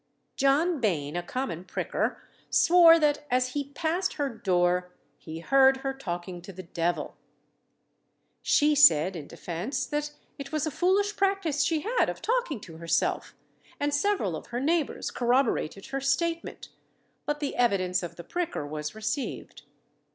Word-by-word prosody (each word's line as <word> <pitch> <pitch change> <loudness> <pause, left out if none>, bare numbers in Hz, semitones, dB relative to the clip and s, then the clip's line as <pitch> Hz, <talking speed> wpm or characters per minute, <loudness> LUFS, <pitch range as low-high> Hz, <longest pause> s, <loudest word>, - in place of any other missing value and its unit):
John 295 +4 +2
Bain, 165 - -1
a 175 - -1
common 180 -2 -4
pricker, 185 - -3 0.3
swore 335 -1 +7
that, 295 -2 +1
as 255 0 +1
he 285 +2 -3
passed 340 +5 -1
her 285 -2 -2
door, 180 -5 0 0.3
he 160 0 -8
heard 270 +5 +5
her 270 - 0
talking 175 -7 -6
to 185 - -10
the 185 0 -9
devil. 170 -2 -2 1.3
She 300 +1 +3
said, 190 - +6
in 155 -4 -7
defence, 180 - -4
that 295 0 -3 0.3
it 280 - -7
was 310 -1 -1
a 310 - -2
foolish 395 +6 +1
practice 390 -7 +1
she 320 -2 0
had 465 +7 +1
of - - -5
talking 470 - -1
to 165 -5 -11
herself, 165 0 -1 0.4
and 290 0 0
several 290 - +1
of - - -8
her 240 - -3
neighbours 310 +2 -1
corroborated 240 - 0
her 275 0 -2
statement; 330 +5 -1 0.6
but 295 0 -1
the 290 -2 -3
evidence 185 -6 +1
of 175 - -7
the 170 - -9
pricker 345 - -3
was 150 +2 -5
received. 220 +6 -4
270 Hz, 150 wpm, -27 LUFS, -, 1.3 s, swore